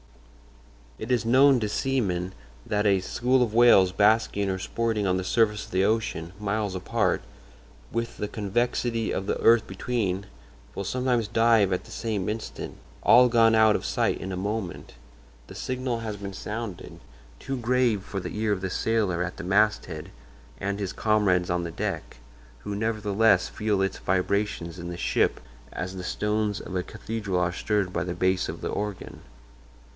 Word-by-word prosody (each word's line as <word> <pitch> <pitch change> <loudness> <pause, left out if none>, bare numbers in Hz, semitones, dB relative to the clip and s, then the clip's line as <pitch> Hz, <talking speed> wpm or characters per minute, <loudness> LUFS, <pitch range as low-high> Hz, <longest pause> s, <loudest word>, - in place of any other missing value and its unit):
"It 110 - -5
is 120 -2 +2
known 130 +2 +5
to 105 -2 -2
seamen 95 -8 -1 0.3
that 105 0 +1
a 100 -1 +4
school 125 +6 +1
of 110 -3 -3
whales 115 -6 +6
basking 100 0 +2
or 95 - -1
sporting 110 +1 -1
on 90 0 +2
the 95 - -2
surface 105 +1 +1
of - - -16
the 95 +1 +2
ocean, 100 -6 -1
miles 105 -1 -1
apart, 95 +1 0 0.7
with 115 0 -3
the 105 - -2
convexity 115 +2 -1
of 95 - -2
the - - -1
earth 115 -1 +5
between, 95 -1 -2 0.5
will 100 - -4
sometimes 125 +1 0
dive 115 -2 +3
at 90 - -2
the - - -14
same 105 -3 -2
instant—all 120 +3 +1
gone 115 -1 +5
out 110 -1 +5
of - - -3
sight - - 0
in 95 - -5
a 90 - -3
moment. 100 -1 -4 0.5
The - - -11
signal 130 -2 -2
has 110 -2 -5
been 100 -1 -7
sounded—too 95 - -7
grave 120 -4 +1
for 100 - -5
the - - -6
ear 110 0 0
of 100 -2 -1
the 95 - -2
sailor 105 -6 0
at 90 - -5
the 100 - -6
masthead 95 -4 +1 0.5
and 100 +1 -2
his 95 -2 -3
comrades 100 -5 +2
on 90 0 0
the 85 - -4
deck—who - - -7
nevertheless 105 -2 +2
feel 105 -2 0
its 95 - -2
vibrations 95 -2 -1
in 85 0 -6
the 85 - -6
ship - - +1 0.3
as 95 +1 -5
the 90 - -6
stones 105 +2 -1
of 95 - -7
a 90 - 0
cathedral 105 -3 -3
are 90 0 +1
stirred 100 -1 -1
by - - 0
the 90 -1 -4
bass 95 0 +1
of - - -6
the - - -3
organ. 105 -1 -5
105 Hz, 170 wpm, -26 LUFS, 95-115 Hz, 0.7 s, whales